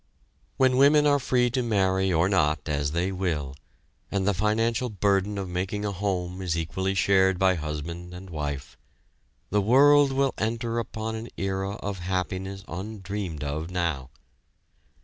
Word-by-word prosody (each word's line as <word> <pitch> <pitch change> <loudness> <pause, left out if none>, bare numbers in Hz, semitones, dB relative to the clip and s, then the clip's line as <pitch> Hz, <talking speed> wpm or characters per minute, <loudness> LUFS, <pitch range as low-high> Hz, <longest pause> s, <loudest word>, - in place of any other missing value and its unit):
When 130 -1 +4
women 145 +2 +6
are 145 -1 +4
free 125 -2 +1
to 130 +1 0
marry 95 -4 +1
or 85 +1 +3
not 80 -6 +1
as 70 -1 -1
they 90 +3 0
will, 80 -8 -2 0.5
and 100 -1 -1
the 100 - +3
financial 110 +5 +1
burden 100 -1 +1
of 95 -1 -3
making 95 +4 -3
a 100 - -1
home 95 -2 -2
is 85 -3 -1
equally 95 +4 -2
shared 95 -1 +3
by 95 0 +4
husband 85 +2 -5
and 90 +1 -10
wife, 70 -4 -5 0.7
the 105 +1 +3
world 140 +6 +6
will 135 0 +1
enter 115 +1 -1
upon 110 0 -4
an 110 +1 -5
era 95 0 -2
of 100 -2 -5
happiness 95 +2 -3
undreamed 95 -4 -5
of 75 +3 -3
now. 85 -7 -2
95 Hz, 150 wpm, -26 LUFS, 90-110 Hz, 0.7 s, women